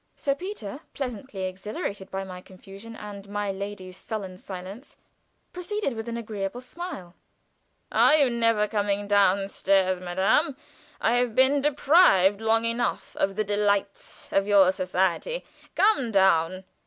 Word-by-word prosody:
Sir 280 - 0
Peter, 280 - -7 0.2
pleasantly 245 -6 -5
exhilarated 190 +1 -5
by 195 0 -4
my 185 -1 -9
confusion 195 +4 -12
and 205 -2 -9
my 205 -1 -2
lady's 195 -1 -7
sullen 190 -4 -6
silence, 195 +8 -9 0.6
proceeded 360 - -3
with 225 +1 -6
an 235 - -3
agreeable 215 -1 -4
smile: 255 - -8 0.8
"Are 300 - +5
you 285 -4 +4
never 230 -3 +2
coming 205 -1 -1
down 200 -1 +3
stairs, 190 -2 +1
madame? 190 - +1 0.4
I 235 +2 +2
have 245 -2 0
been 270 +2 +4
deprived 270 - +4
long 225 +1 +2
enough 230 +1 -2
of 195 0 0
the 215 - 0
delights 205 -1 -2
of 195 0 +2
your 195 -3 +6
society. 190 - -1 0.3
Come 335 - +3
down! 185 -2 +3
205 Hz, 135 wpm, -26 LUFS, 190-240 Hz, 0.8 s, your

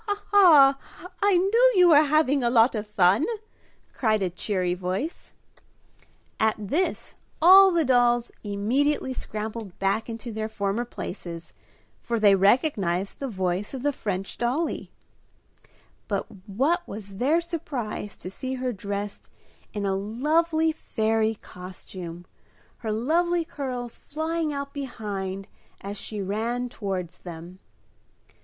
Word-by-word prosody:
"Ha! 410 0 -1
Ha! 300 -9 +7
Ha! 355 +4 -14
I 400 -2 +4
knew 460 +7 +4
you 360 -2 +6
were 300 -2 +8
having 290 -2 +2
a 240 - +3
lot 235 0 +5
of 215 -1 -4
fun!" 195 +3 +3 0.7
cried 215 -4 +1
a 180 - -1
cheery 185 -1 -1
voice. 185 - -4 1.1
At 220 0 +3
this, 285 - -2 0.3
all 385 +4 +9
the 340 -3 +2
dolls 240 -2 +3
immediately 260 +7 0
scrambled 215 -4 -6
back 200 +4 0
into 230 +1 -6
their 220 0 -3
former 205 +2 -2
places, 170 -7 -7 0.5
for 235 -1 -2
they 205 -2 +6
recognized 195 - +2
the 275 - -3
voice 190 +1 -2
of 260 - -6
the 290 0 +1
French 195 -5 -4
dollie. 260 +8 -1 1.2
But 200 -2 -1 0.2
what 275 - +1
was 200 -1 -8
their 285 +9 +3
surprise 295 - -5
to 185 - -8
see 260 +6 -4
her 255 -1 -2
dressed 200 0 -5 0.4
in 205 -1 -3
a 195 - +1
lovely 315 +10 +1
fairy 220 -6 0
costume, 180 -2 -9 0.5
her 220 -2 -4
lovely 335 +9 +1
curls 250 -6 -5
flying 315 +1 -2
out 280 -1 -5
behind, 200 -8 -5 0.3
as 200 +1 -5
she 210 0 -5
ran 230 +5 -2
towards 185 -6 -4
them. 175 +1 -10
230 Hz, 130 wpm, -25 LUFS, 200-290 Hz, 1.2 s, all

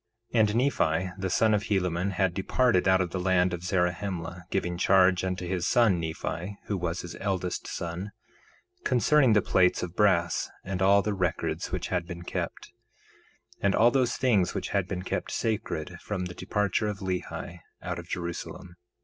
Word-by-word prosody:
1:2 120 - +3
And 105 -1 +3
Nephi, 95 - +1
the 95 - -1
son 110 +4 +3
of 100 -1 +1
Helaman, 95 -1 0
had 95 -1 +1
departed 100 +1 +2
out 95 0 +5
of 90 -2 -2
the 95 - -2
land 90 -1 +2
of 90 0 -5
Zarahemla, 90 -1 -2
giving 90 -2 -1
charge 95 0 +4
unto 90 -1 -2
his 90 -1 -1
son 110 -7 +4
Nephi, 85 +4 -4
who 105 - -2
was 90 -1 -2
his 85 0 -8
eldest 95 -2 -2
son, 90 +4 -5 0.7
concerning 130 0 +4
the 105 -3 +4
plates 90 -1 +3
of 90 -1 -5
brass, 90 -5 +2
and 95 -1 -4
all 100 +1 +5
the 105 +2 -1
records 90 -4 -2
which - - -3
had 90 -2 -1
been 85 0 -7
kept, - - -5 0.9
and 100 0 +2
all 120 +2 +5
those 125 -2 +1
things 110 -9 +2
which - - -3
had 100 -3 0
been 90 -1 -4
kept - - -3
sacred 90 -6 -2
from 95 -3 -3
the 90 - -6
departure 105 +3 -1
of 105 -1 -3
Lehi 90 -2 -4 0.2
out 90 -1 -3
of 85 0 -10
Jerusalem. 85 0 -5
95 Hz, 175 wpm, -28 LUFS, 90-100 Hz, 0.9 s, out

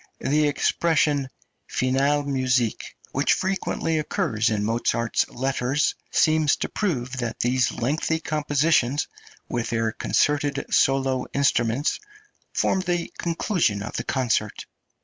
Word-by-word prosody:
The 150 +2 +2
expression 145 -2 +1 0.4
"finalmusik," 130 -2 0 0.2
which - - +2
frequently 185 -4 -1
occurs 115 -6 0
in 105 -2 -1
Mozart's 115 +1 0
letters, 135 +2 0 0.2
seems 155 -2 +3
to - - -4
prove 130 - -2
that 120 -2 -3
these 125 +1 +2
lengthy 155 +6 -1
compositions, 150 -3 +1 0.4
with 120 -1 -2
their 115 -1 0
concerted 145 +4 0
solo 135 -1 +2
instruments, 135 -1 +1 0.5
formed 190 -1 0
the 175 -1 -2
conclusion 165 - 0
of - - -7
the - - -2
concert. 115 -5 -1
135 Hz, 110 wpm, -24 LUFS, 120-155 Hz, 0.5 s, seems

